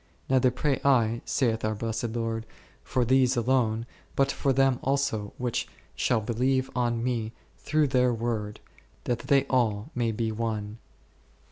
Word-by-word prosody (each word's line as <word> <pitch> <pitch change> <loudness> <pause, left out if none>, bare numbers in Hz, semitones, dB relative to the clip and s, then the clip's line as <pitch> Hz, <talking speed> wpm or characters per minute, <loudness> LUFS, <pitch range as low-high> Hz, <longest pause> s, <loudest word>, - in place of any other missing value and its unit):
Neither 130 -1 +5
pray 135 +2 -1
I, 120 -4 +3
saith 115 -5 0
our 110 0 0
blessed 115 +1 -3
Lord, 115 -1 -2 0.4
for 125 -2 0
these 130 0 +3
alone, 115 -2 +1 0.3
but 135 0 +2
for 140 - 0
them 135 -1 +3
also 135 -7 0
which 125 -2 -2 0.3
shall 120 -3 +1
believe 130 +4 0
on 120 -2 0
Me 115 -3 -2 0.3
through 155 0 +1
their 125 -2 +3
word, 110 -2 -3 0.4
that 120 -1 -1
they 140 -2 +2
all 120 -1 0
may 120 -2 0
be 110 0 -1
one 110 -1 -3
r. - - -35
120 Hz, 150 wpm, -27 LUFS, 110-130 Hz, 0.4 s, Neither